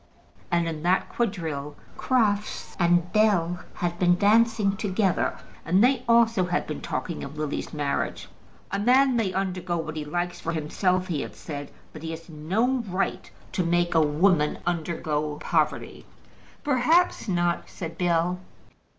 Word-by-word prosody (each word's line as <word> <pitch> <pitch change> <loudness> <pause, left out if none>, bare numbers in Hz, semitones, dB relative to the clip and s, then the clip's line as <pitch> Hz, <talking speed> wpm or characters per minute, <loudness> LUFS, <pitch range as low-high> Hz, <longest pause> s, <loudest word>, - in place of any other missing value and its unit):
And 170 -1 +1
in 160 -2 -4
that 180 +3 +1
quadrille 160 -10 -3 0.2
Crofts 210 -5 0
and 175 0 +2
Bell 180 -5 +3 0.2
had 175 0 -2
been 175 -1 +4
dancing 215 0 +3
together, 195 -2 0 0.3
and 185 +5 +3
they 255 0 +3
also 230 -4 +4
had 180 0 -1
been 155 - -5
talking 170 - -4
of 140 +2 -8
Lily's 150 -1 -3
marriage. 145 -2 -2 0.4
"A 200 - -1
man 255 +4 +4
may 220 -5 +1
undergo 185 -2 -2
what 160 -1 -4
he 155 - -3
likes 175 +4 -3
for 165 - -3
himself," 180 +4 0
he 160 -6 -2
had - - -7
said, 145 -2 -7 0.2
"but 155 - -9
he 160 - -5
has 165 0 -7
no 195 +12 0
right 190 +1 -2 0.2
to 185 - 0
make 175 +1 +1
a 165 - +5
woman 150 +1 +2
undergo 155 -3 -2
poverty." - - -1 0.6
"Perhaps 295 +4 +2
not," 175 -2 0
said 165 -2 -7
Bell. 175 0 +1
175 Hz, 150 wpm, -26 LUFS, 160-205 Hz, 0.6 s, a